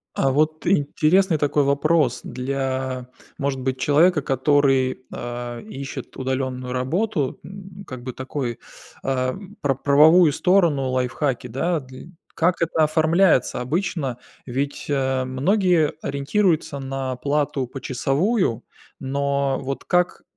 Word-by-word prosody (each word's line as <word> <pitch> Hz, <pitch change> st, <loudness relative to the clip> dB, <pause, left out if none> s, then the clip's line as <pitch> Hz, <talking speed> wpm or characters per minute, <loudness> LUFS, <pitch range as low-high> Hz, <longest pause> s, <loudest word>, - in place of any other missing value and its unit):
А 135 Hz, -, +2 dB
вот 155 Hz, +3 st, 0 dB
интересный 165 Hz, +1 st, +3 dB
такой 145 Hz, 0 st, +2 dB
вопрос. 140 Hz, -2 st, +2 dB
Для, 130 Hz, -1 st, -3 dB, 0.3 s
может 140 Hz, -1 st, -2 dB
быть, 130 Hz, 0 st, -2 dB
человека, 155 Hz, +4 st, +4 dB
который, 135 Hz, -1 st, +2 dB
а, 120 Hz, 0 st, -5 dB
ищет 140 Hz, -, -8 dB
удаленную 130 Hz, -1 st, -3 dB
работу, 145 Hz, -, -1 dB
м, 195 Hz, 0 st, -11 dB
как 125 Hz, -1 st, -8 dB
бы 130 Hz, -, -4 dB
такой, 130 Hz, -2 st, -4 dB, 0.4 s
а, 130 Hz, -1 st, 0 dB, 0.3 s
про 140 Hz, -2 st, +2 dB
правовую 150 Hz, +5 st, +6 dB
сторону, 170 Hz, -8 st, +2 dB
лайфхаки, 130 Hz, 0 st, -1 dB
да, 155 Hz, +8 st, -1 dB
дл 130 Hz, +3 st, -12 dB, 0.2 s
Как 170 Hz, +2 st, +1 dB
это 165 Hz, -1 st, +2 dB
оформляется 160 Hz, -3 st, +3 dB
обычно? 145 Hz, -2 st, -2 dB, 0.3 s
Ведь, 140 Hz, +3 st, -3 dB
а, 130 Hz, -2 st, 0 dB
многие 165 Hz, +4 st, +2 dB
ориентируются 145 Hz, +1 st, 0 dB
на 135 Hz, -1 st, -3 dB
плату 140 Hz, -1 st, -1 dB
почасовую, 135 Hz, -, 0 dB, 0.4 s
но 140 Hz, 0 st, -1 dB
вот 135 Hz, 0 st, -4 dB
как 180 Hz, 0 st, +1 dB
140 Hz, 115 wpm, -22 LUFS, 130-160 Hz, 0.4 s, правовую